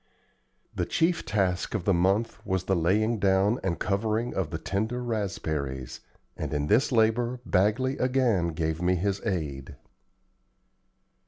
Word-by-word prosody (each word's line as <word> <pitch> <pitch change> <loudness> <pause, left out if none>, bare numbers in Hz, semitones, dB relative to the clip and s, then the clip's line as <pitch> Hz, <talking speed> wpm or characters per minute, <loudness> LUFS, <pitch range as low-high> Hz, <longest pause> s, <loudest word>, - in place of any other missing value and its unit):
The - - -2
chief 165 +1 +1
task 95 -2 0
of 95 -5 -3
the 100 - +3
month 95 +6 +1
was 95 -2 -1
the 95 - +1
laying 105 +7 +1
down 100 +4 +3
and 85 -3 -1
covering 110 +5 -1
of 95 -5 -2
the - - -3
tender 110 +5 -2
raspberries; 80 - -3 0.4
and - - -4
in 75 0 0
this 110 - +3
labor 120 +2 +2
Bagley 110 +8 +1
again 125 -9 +2
gave 80 +1 -2
me 90 +1 +2
his 100 +2 -1
aid. 75 - -3
100 Hz, 140 wpm, -27 LUFS, 90-115 Hz, 0.4 s, the